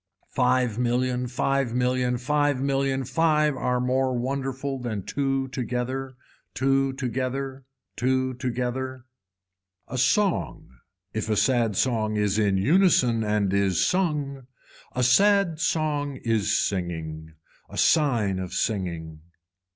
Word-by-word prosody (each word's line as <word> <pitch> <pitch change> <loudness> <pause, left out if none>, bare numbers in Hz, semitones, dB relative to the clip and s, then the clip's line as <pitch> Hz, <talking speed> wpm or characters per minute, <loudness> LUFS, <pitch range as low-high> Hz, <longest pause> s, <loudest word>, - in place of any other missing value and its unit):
Five 125 -3 +1
million, 125 +1 0
five 130 0 0
million, 125 0 +1
five 145 +2 +1
million, 135 0 0
five 150 -1 +2
are 125 -1 0
more 130 0 +1
wonderful 135 +1 -3
than 110 -5 -4
two 135 +1 -1
together. 130 +1 -3 0.4
Two 135 0 +1
together, 130 +1 -3 0.3
two 130 +1 0
together. 125 0 -3 0.8
A 130 - -4
song, 190 - +1 0.4
if 110 0 -3
a 110 - +2
sad 120 -5 +2
song 110 -2 0
is 105 0 +1
in 100 -2 +2
unison 125 - +3
and 105 -2 0
is 100 -3 +2
sung, 145 -8 -1 0.5
a 125 - +1
sad 195 - +4
song 150 -3 0
is 115 -3 +1
singing. 80 -4 -5 0.3
A - - -9
sign 115 - +2
of 90 -1 -5
singing. 85 -7 -3
130 Hz, 115 wpm, -25 LUFS, 115-135 Hz, 0.8 s, sad